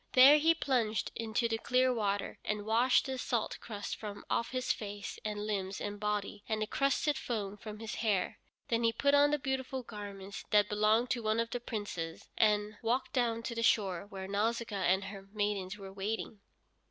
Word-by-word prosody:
There 275 +4 +9
he 325 +2 +4
plunged 240 -8 0
into 230 +1 0
the 225 -1 -1
clear 255 +2 +3
water, 205 -3 -1
and 210 -1 -2
washed 235 +4 +4
the 265 -1 -3
salt 235 -3 -1
crust 205 -3 -5
from 205 -2 -7
off 235 - +1
his 255 0 0
face 205 -1 -6
and 210 -1 -3
limbs 195 -2 -2
and 205 0 -4
body, 210 0 -2
and 220 -1 0
the 215 - 0
crusted 275 +4 +1
foam 210 -4 -3
from 215 0 -8
his 220 0 -6
hair. 210 -5 0 0.3
Then 230 0 +1
he 230 0 +3
put 280 +4 +2
on 285 0 +6
the 295 - +2
beautiful 265 -1 -2
garments 200 -3 -7
that 210 -1 +4
belonged 215 +4 +3
to 240 - 0
one 215 0 +1
of 230 0 -1
the 245 - -2
Princes, 205 -8 -5
and 210 -1 +2
walked 240 +5 0
down 235 -3 +1
to 235 - -3
the 230 - -2
shore 200 -5 +2
where 190 -1 -6
Nausicaa 220 +2 0
and 190 +2 +3
her 195 -1 -8
maidens 205 -2 -1
were 195 -1 -9
waiting. 205 +2 -3
215 Hz, 190 wpm, -33 LUFS, 205-240 Hz, 0.3 s, There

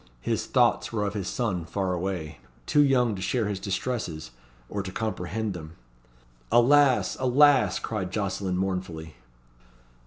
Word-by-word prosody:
His - - -2
thoughts - - +2
were 105 -2 -1
of 100 - -2
his 100 -3 -4
son 105 -8 -2
far 95 +2 -2
away 90 -3 -4 0.3
too 145 - +4
young 125 -5 +3
to 95 - -6
share 110 +3 0
his 100 -2 -3
distresses, 95 - -3 0.4
or 100 - -3
to 95 -1 -6
comprehend 110 0 -3
them." 80 -2 -9 0.8
"Alas! 135 +2 +4
alas!" 130 -5 +4
cried 95 -5 -4
Jocelyn 95 -2 -2
mournfully. 90 -4 -3
100 Hz, 135 wpm, -26 LUFS, 90-120 Hz, 0.8 s, too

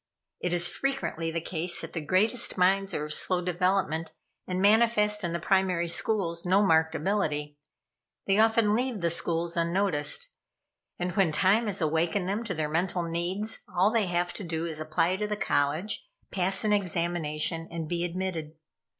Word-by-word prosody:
It 180 - -2
is 175 0 +4
frequently 270 -12 -2
the 165 +1 -2
case 170 +1 -2
that - - -8
the 165 - -3
greatest 195 +11 +1
minds 195 +2 +3
are 150 - -2
of 150 - -3
slow 185 +3 +2
development, 180 -3 0 0.3
and 185 0 -2
manifest 210 0 +4
in 175 - -1
the 170 - -2
primary 185 -1 +1
schools 170 -2 0
no 195 +3 +3
marked 160 -2 +3
ability. 150 -7 -1 0.7
They 195 +1 +2
often 225 -1 +4
leave 245 -2 -1
the 170 -1 +1
schools 170 0 0
unnoticed; 175 - 0 0.7
and 180 0 -2
when 195 -6 +3
time 195 +8 +3
has 195 -2 -2
awakened 165 +4 0
them 205 +4 -1
to 190 -6 -3
their 155 -1 -1
mental 175 +3 -1
needs, 175 +6 -3 0.2
all 190 +4 +4
they 225 -4 +1
have 175 0 -1
to - - -6
do 165 -1 -3
is 160 -2 -5
to 155 - -4
apply 165 +4 +1
to 210 +1 -2
the 210 0 -3
college, 170 - -1 0.2
pass 190 +2 +1
an 210 -1 +2
examination, 170 -4 -1
and 165 -2 -5
be 170 +1 -2
admitted. 175 -3 -3
180 Hz, 175 wpm, -28 LUFS, 165-200 Hz, 0.7 s, is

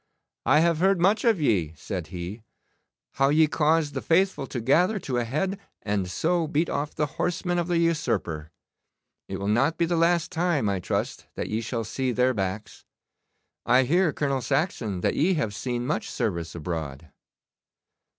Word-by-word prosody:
'I 140 +5 +6
have 170 -1 +3
heard 190 +1 +3
much 200 +5 +3
of 225 -6 +3
ye,' 90 - +1
said 85 +1 -5
he; 90 +5 -6 0.7
'how 135 0 +2
ye 155 +2 +5
caused 155 -1 +1
the 130 - -3
faithful 175 -4 +2
to 125 - -4
gather 175 - +3
to 135 -9 -3
a - - 0
head, 170 - -2 0.2
and 100 -3 -1
so 165 - 0
beat 155 +2 0
off 145 +1 -2
the 150 - +1 0.2
horsemen 175 0 0
of 170 - -1
the 175 -1 +1
usurper. 115 - 0 0.8
It - - -3
will 100 - -4
not 125 +9 +2
be 170 - +2
the 170 +1 0
last 165 0 +2
time, 170 -8 +1
I 100 -1 0
trust, - - -3
that - - -4
ye 110 +2 -1
shall 115 0 -3
see 130 +4 -2
their 125 +1 +2
backs. 100 0 -4 0.8
I 125 +2 +4
hear, 170 +5 +2
Colonel 140 -2 -1
Saxon, 115 - -1
that - - +1
ye 180 +5 +2
have 125 -10 -1
seen 120 +4 -3
much - - -2
service 85 -8 -2
abroad. 80 -3 -5
135 Hz, 175 wpm, -26 LUFS, 105-170 Hz, 0.8 s, I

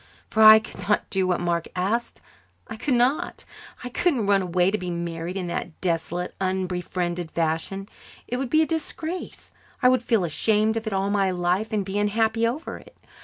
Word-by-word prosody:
For 220 - 0
I 215 0 +11
could 215 -1 -6
not 210 - +2
do 190 -2 +1
what 180 -1 +1
Mark 170 -1 -1
asked 205 +6 -1 0.5
I 220 - -6
could 250 +4 0
not. 250 +5 0 0.4
I 250 - -5
couldn't 260 - +1
run 200 -1 +3
away 180 +1 +1
to 215 - 0
be 180 - -4
married 170 +1 -4
in 185 - -3
that 170 -1 -5
desolate, 175 0 -2
unbefriended 180 -2 -2
fashion. 165 +5 -2 0.4
It 245 - -2
would 265 -1 -3
be 315 +3 +4
a - - +1
disgrace. 325 +2 -4 0.3
I 250 - +7
would 255 -2 +3
feel 230 -5 +1
ashamed 215 +6 +1
of 225 0 -3
it 215 - -2
all 195 +1 0
my 200 -2 +2
life 180 +4 0
and 210 -3 0
be 195 +1 -2
unhappy 220 +2 +1
over 280 +8 -4
it. - - -18
195 Hz, 190 wpm, -24 LUFS, 180-225 Hz, 0.5 s, I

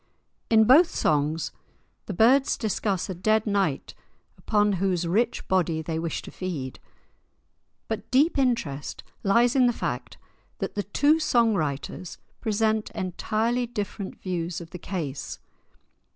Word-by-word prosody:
In 220 -1 +6
both 295 +10 +6
songs 155 +2 0 0.6
the 205 - -3
birds 260 +7 +4
discuss 205 -3 -1
a 190 - -3
dead 215 +5 +1
knight 195 -9 0 0.4
upon 210 -1 +1
whose 180 -3 +1
rich 230 +7 0
body 170 -4 +1
they 160 0 -3
wish 165 0 -3
to - - -9
feed. 155 -9 -5 1.1
But 220 0 -4
deep 290 +6 +3
interest 230 - -1 0.2
lies 235 +5 +3
in 255 -2 +5
the - - +3
fact - - -4 0.4
that - - -4
the 205 - -1
two 290 +10 +2
song 235 -7 +3
writers 155 0 -3 0.2
present 220 0 0
entirely 220 +6 -1
different 205 -3 -5
views 175 -2 -3
of 170 -1 -10
the 180 - -7
case. 160 -7 -4
200 Hz, 135 wpm, -26 LUFS, 170-230 Hz, 1.1 s, In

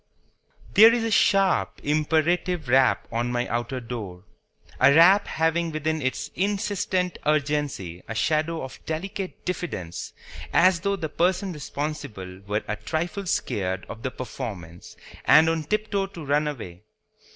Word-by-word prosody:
THERE 225 +2 +8
is 235 - -1
a 225 - -1
sharp, 195 -2 +3
imperative 160 +3 +1
rap 130 +1 +3
on 120 +2 -1
my 120 0 -1
outer 120 +2 -2
door; 110 -7 -7 0.6
a 135 +2 +6
rap 180 +7 +6
having 165 +1 0
within 155 0 -2
its 130 -1 -2
insistent 195 -2 -1
urgency 145 - -1
a 115 - -5
shadow 155 +6 0
of 130 - -9
delicate 185 +4 -5
diffidence, 95 - -4 0.4
as 185 0 +4
though 200 +3 0
the 165 -5 -4
person 180 +4 0
responsible 140 - -5
were 105 +1 -1
a 105 - -2
trifle 175 +5 -3
scared 95 - -1
of 115 - -9
the 130 - -2
performance 100 -10 -8 0.3
and 155 +2 +7
on 160 -1 0
tiptoe 210 +1 -1
to 170 -5 -10
run 145 +2 +1
away. 95 -11 -6
155 Hz, 140 wpm, -25 LUFS, 120-180 Hz, 0.6 s, THERE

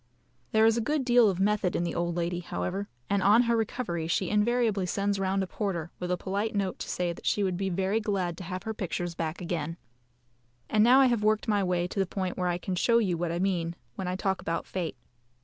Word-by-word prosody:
There 220 0 +5
is 225 +1 +4
a - - +1
good 290 +3 0
deal 240 -3 +6
of 185 -2 -2
method 200 -2 +1
in - - +1
the 170 - -2
old 170 0 -1
lady, 175 0 -1
however, 190 +3 -3 0.2
and 200 -1 +1
on 210 +5 +6
her 235 -1 +2
recovery 215 -7 -2
she 180 +3 0
invariably 210 -2 +2
sends 200 +1 0
round 195 0 +1
a - - -1
porter, 180 -4 -3
with 180 - -4
a 180 - +1
polite 200 +4 -2
note 195 -2 -1
to - - -5
say 175 -1 -1
that - - -9
she 205 - +2
would 185 -2 0
be 195 +1 -1
very 190 +4 0
glad 195 -5 -1
to - - -6
have 185 +1 -5
her 220 - -3
pictures 175 -3 -3
back 165 0 -4
again. 165 -2 -3 0.9
And 215 0 +5
now 255 +4 +7
I - - +6
have 240 -4 +2
worked 215 0 +2
my 205 -2 +2
way 180 -1 0
to 195 - -4
the 195 - +2
point 185 -1 -3
where 180 -1 -1
I 175 - 0
can 185 +1 -4
show 230 +6 +3
you 195 -7 +2
what 170 0 -2
I 170 - -2
mean 175 -2 0 0.2
when 190 - -5
I 180 - -1
talk 190 0 -1
about 165 0 -2
fate. 170 -7 -4
190 Hz, 245 wpm, -28 LUFS, 175-210 Hz, 0.9 s, now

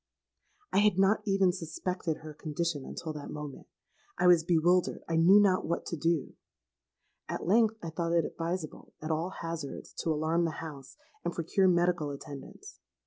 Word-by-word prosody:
"I - - +5
had 210 -3 +4
not 195 +3 +4
even 195 -2 +3
suspected 180 -1 -3
her 155 -1 -8
condition 155 -1 -3
until 160 -2 -5
that 150 -1 -7
moment. 150 -2 -7 0.5
I - - +1
was 175 -2 +6
bewildered—I 170 0 +2
knew 175 +5 +7
not 195 -3 +3
what 170 - -2
to - - -3
do. 165 -2 0 1.0
At - - -3
length 220 +4 +3
I 165 - -4
thought 170 +1 -1
it 170 -1 +3
advisable, 165 -1 -5
at 155 +1 -4
all 160 +3 -1
hazards, 165 -4 -5
to - - -1
alarm 160 +2 +1
the 160 -2 -3
house, 145 -5 -9 0.3
and 170 - -2
procure 180 +3 +2
medical 175 -3 +2
attendance. 140 0 -9
170 Hz, 160 wpm, -30 LUFS, 155-180 Hz, 1.0 s, knew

